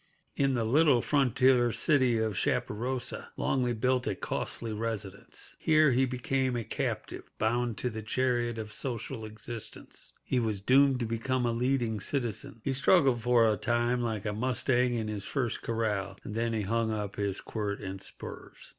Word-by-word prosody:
In 135 -1 +2
the 115 -2 0
little 140 +2 +5
frontier 130 -3 +3
city 130 -4 +3
of 110 -1 0
Chaparosa, 125 +7 -1
Longley 125 -2 +1
built 125 +2 +1
a - - 0
costly 115 -2 -3
residence. 105 -3 -5
Here 155 -2 +5
he 130 +2 +3
became 130 +1 0
a 120 - -1
captive, - - -4
bound 120 +1 0
to 125 - -1
the 110 0 -5
chariot 120 0 0
of 110 -1 -5
social 115 -3 -4
existence. 110 +1 -8
He 130 - 0
was 110 -4 -1
doomed 130 +4 +4
to - - +1
become 120 +3 -1
a 120 - +2
leading 120 -2 0
citizen. 115 -1 -3
He 135 - 0
struggled 135 -3 +4
for 120 -1 +4
a 105 -1 +2
time 120 +4 +1
like 110 -4 -2
a 105 - -1
mustang 125 +1 +1
in 110 -2 -2
his 105 -2 -4
first 120 0 -2
corral, 105 -4 -1
and 105 - -6
then 115 +1 0
he 110 - 0
hung 115 +3 0
up 105 -2 -3
his 100 -2 -1
quirt 105 -2 -3
and 95 0 -6
spurs. - - -9
120 Hz, 170 wpm, -30 LUFS, 110-130 Hz, -, little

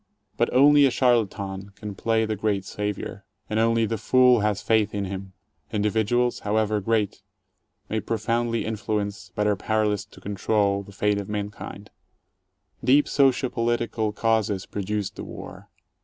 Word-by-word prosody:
But - - +1
only 145 +2 +6
a - - +2
charlatan 100 -6 0
can 105 -1 -7
play 110 +3 +1
the 110 0 -2
great 100 -2 -1
Savior, 105 -1 -4 0.2
and 110 - -1
only 115 0 +3
the 110 0 -2
fool 125 +2 +5
has 105 -1 0
faith 110 -2 +2
in 100 -1 -1
him. 95 0 -6 0.4
Individuals, 110 +4 +1
however 105 0 0
great, 110 -1 0 0.7
may 110 - -1
profoundly 115 +2 -1
influence, 105 -3 -3
but 105 - 0
are 105 -1 +3
powerless 105 0 0
to - - -17
control, 100 0 0
the 100 - -12
fate 105 +1 0
of 100 - -10
mankind. 105 0 -6 0.9
Deep 140 +3 +4
socio 135 -2 +2
political 115 -2 0
causes 110 -3 0
produced 105 0 -3
the - - -5
war. - - -10
105 Hz, 145 wpm, -25 LUFS, 100-115 Hz, 0.9 s, only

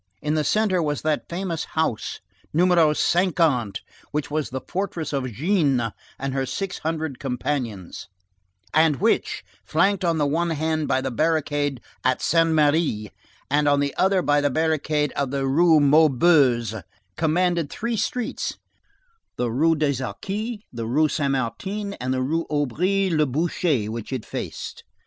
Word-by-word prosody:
In 150 0 -1
the 155 -1 +1
centre 195 +2 +2
was 150 -2 -2
that 155 -1 -1
famous 170 -2 -3
house 160 -9 -1 0.3
No. 170 +4 +3 0.3
50, 175 +4 +1 0.7
which 150 -1 -3
was 155 -1 -1
the 130 +1 -4
fortress 175 -5 -3
of 130 -3 -2
Jeanne 135 - +1 0.2
and 135 0 -3
her 135 -1 -1
six 190 +9 -4
hundred 160 -4 -3
companions, 125 -7 -3 0.7
and 155 -1 +4
which, 125 - 0 0.2
flanked 190 - +1
on 170 -2 +1
the 150 - +2
one 165 +4 0
hand 155 -1 -1
by - - +2
a 135 - -2
barricade 145 -2 0 0.2
at 130 +1 +2
Saint 165 -1 +3
Merry, 150 -9 +2 0.4
and 145 +1 +2
on 145 0 +4
the 140 -1 0
other 190 -1 +2
by 145 0 +3
a 145 0 +2
barricade 155 -1 0
of 140 -2 -2
the 135 0 -1
Rue 160 +4 +5
Maubuée, 140 - +4 0.3
commanded 170 - +1
three 235 +1 -3
streets, 225 +3 -2 0.8
the 120 -1 -1
Rue 160 +7 +3
des 140 -4 0
Arcis, 210 - -4
the 115 -2 -4
Rue 150 +6 +2
Saint 140 -2 0
Martin, 190 - -3
and 130 -8 -4
the 130 0 0
Rue 165 +5 -1
Aubry 180 +7 +1
le 155 -2 +2
Boucher, 150 - 0
which 115 +1 -6
it 130 -4 -3
faced. - - -6
150 Hz, 155 wpm, -23 LUFS, 135-170 Hz, 0.8 s, Rue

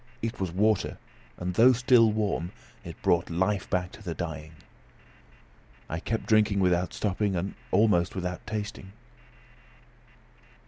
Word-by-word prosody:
It 115 - -3
was 95 -3 -2
water; 105 +3 +1 0.4
and 90 +1 -3
though 120 +7 +6
still 120 -2 +5
warm, 100 -5 -1 0.3
it - - -9
brought 85 0 +2
life 95 +3 0
back 90 -1 -1
to - - -13
the 85 -5 -5
dying. 80 -2 -6 1.3
I 80 - -3
kept 115 +5 -3
drinking 105 -2 +3
without 90 -1 +2
stopping, 100 -1 -1
and 95 +3 -2 0.2
almost 95 -3 +3
without 90 +1 -4
tasting. 105 -3 -5
95 Hz, 130 wpm, -27 LUFS, 90-110 Hz, 1.3 s, though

